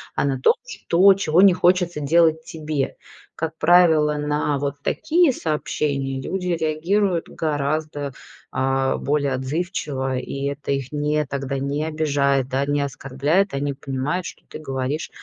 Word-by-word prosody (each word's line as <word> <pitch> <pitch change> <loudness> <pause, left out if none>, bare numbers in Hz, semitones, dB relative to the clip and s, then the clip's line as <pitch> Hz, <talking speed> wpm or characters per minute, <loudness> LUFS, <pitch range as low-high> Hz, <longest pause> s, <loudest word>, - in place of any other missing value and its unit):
а - - +1
на 135 -2 -1
том, - - +5
что 185 +4 +4
чего 180 -3 +2
не 195 -2 +7
хочется 175 -3 +2
делать 160 +2 +3
тебе. 155 -3 -3 0.4
Как 160 0 -4
правило, 160 -3 +5
на 150 -1 -1
вот 140 0 -2
такие 320 -2 +2
сообщения 140 - -2
люди 180 +5 -3
реагируют 170 +3 0
гораздо, 145 -1 -2 0.4
а, 135 0 0
более 145 -1 0
отзывчиво, 135 -1 -2
и 135 +1 -5
это 140 0 -3
их 135 -2 -2
не 150 0 0
тогда 135 0 -3
не 140 +2 -2
обижает, 140 -4 +1
да, 135 +1 0
не 145 0 +1
оскорляет. 140 +7 0
Они 140 +1 -1
понимают, 140 +6 -3
что - - -11
ты - - -9
говоришь, 135 +1 -3
150 Hz, 140 wpm, -22 LUFS, 140-165 Hz, 0.4 s, не